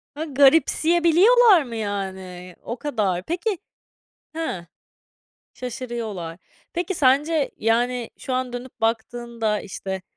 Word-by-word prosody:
Ha 305 - -3
garipsiye 315 +4 +4
biliyorlar 395 +2 +6
mı 240 -3 -8
yani? 190 -4 -5
O 235 - -5
kadar. 205 -11 -1
Peki, 360 - -2 0.8
hıh, 190 - -3 0.9
şaşırıyorlar. 235 -8 -5 0.3
Peki 360 +2 -2
sence 290 +1 +2
yani 240 +2 0
şu 260 - -5
an 255 -1 -2
dönüp 245 +1 -8
baktığında 225 -1 -1
işte 190 -1 -6
245 Hz, 105 wpm, -23 LUFS, 210-310 Hz, 0.9 s, biliyorlar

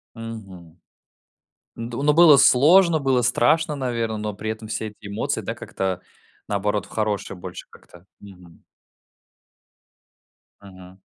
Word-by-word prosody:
Мгм. 95 -7 -10 1.0
Д 115 +1 -6
но 150 0 +4
было 165 -4 +8
сложно, 165 +7 +5
было 135 -3 +1
страшно, 150 +7 +2
наверно, 115 -4 -2
но 105 -1 -4
при 110 +2 -5
этом 110 0 -7
все 110 0 -4
эти 105 0 -14
эмоции, 100 +1 -3
да, - - -5
как-то, 95 -1 -4 0.5
наоборот, 100 -1 -1
в - - -20
хорошее 105 -3 -3
больше 90 0 -9
как-то, 90 +2 -18
мгм. 90 -4 -16 2.0
Мгм. 95 -1 -14
110 Hz, 125 wpm, -22 LUFS, 95-125 Hz, 2.0 s, было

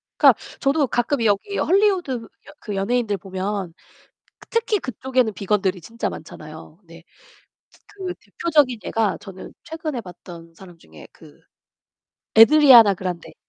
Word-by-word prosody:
그니까 - - +6 0.3
저도 280 0 +1
가끔 240 +1 -1
여기 205 - 0
Hollywood 380 -5 +2
여 230 -3 -5 0.3
그 210 - -6
연예인들 210 +1 -1
보면 190 -1 -5 0.8
특히 455 -2 0
그쪽에는 255 - -1
비건들이 195 -1 -1
진짜 230 +7 -5
많잖아요. 155 +1 -11
네. 165 0 -15 0.9
그 370 -2 -7
대표적인 290 -8 0
예가 210 -7 -1
저는 190 -1 -11
최근에 310 -6 -5
봤던 170 -3 -13
사람 180 -2 -15
중에 80 - -16
그 - - -18 1.0
Ariana 235 -5 +8
Grande. 180 -2 -6
220 Hz, 330 characters per minute, -21 LUFS, 185-275 Hz, 1.0 s, Ariana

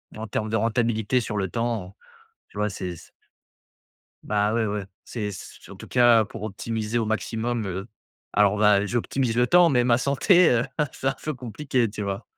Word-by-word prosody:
en 110 +1 -6
terme 110 +1 -3
de 110 - -1
rentabilité 115 +1 +1
sur 105 -2 -4
le 95 -2 -1
temps, 115 -4 -2
heu, - - -12 0.6
tu - - -14
vois, 105 0 0
c'est 90 -2 -5
c - - -15 1.1
Ben, 105 0 0
ouais, 115 -1 +1
ouais. 105 -1 -3 0.2
C'est 105 -4 -4
c' 95 - -11
en - - -10
tout - - -11
cas, 120 -3 +5
pour 115 - -9
optimiser 110 +2 -3
au 115 - -1
maximum, 115 +1 -2
heu. 95 +1 -5 0.5
Alors, 105 -1 +4
on - - -2
va 105 -1 +4
j'optimise 120 +2 -1
le 120 0 +4
temps, 175 +3 +5
mais 125 -2 +3
ma 120 -1 +3
santé, 165 - +4
heu, 120 -1 +2
ah 150 - +1
c'est - - -7
un 135 - -1
peu 155 - -2
compliqué, 125 0 -1
tu 105 +1 -6
vois. 100 -1 -4
110 Hz, 205 wpm, -24 LUFS, 105-120 Hz, 1.1 s, cas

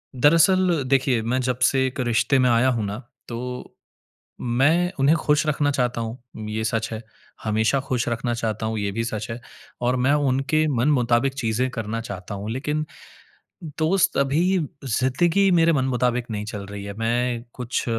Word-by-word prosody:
दरअसल 165 +4 +4
देखिए, 130 -3 +2
मैं 120 +4 -1
जब 125 -1 -1
से 130 -1 +1
एक 130 - -7
रिश्ते 120 +2 +2
में 125 - +4
आया 120 +2 +4
हूँ 115 -3 -1
ना 100 +2 -4 0.3
तो 125 +1 -6 0.7
मैं 145 +9 +2
उन्हें 145 +5 +4
खुश 150 -1 +1
रखना 145 -1 +1
चाहता 125 -3 -1
हूँ 115 +1 -5 0.3
ये 110 +1 -2
सच 110 0 -1
है। 110 - -5 0.4
हमेशा 110 +5 +1
खुश 130 -3 -2
रखना 120 +1 -1
चाहता 110 -2 -2
हूँ 110 0 -2
ये 100 -1 -1
भी 115 +3 -1
सच 110 -2 -4
है 115 - -5 0.4
और 125 +1 +1
मैं 140 - +4 0.2
उनके 140 +4 +1
मनमुताबिक 125 0 +2
चीज़ें 125 -1 0
करना 115 0 -4
चाहता 100 -2 -7
हूँ। 100 +2 -5
लेकिन 150 +5 -2 0.9
दोस्त, 165 +4 +2
अभी 165 +8 +2 0.3
ज़िंदगी 160 - +2
मेरे 165 -1 +4
मनमुताबिक 125 -3 0
नहीं 105 -1 -3
चल 105 -2 -6
रही 100 0 -7
है। 100 - -6
मैं 120 +1 0
कुछ 125 -1 -3
125 Hz, 165 wpm, -23 LUFS, 115-140 Hz, 0.9 s, दरअसल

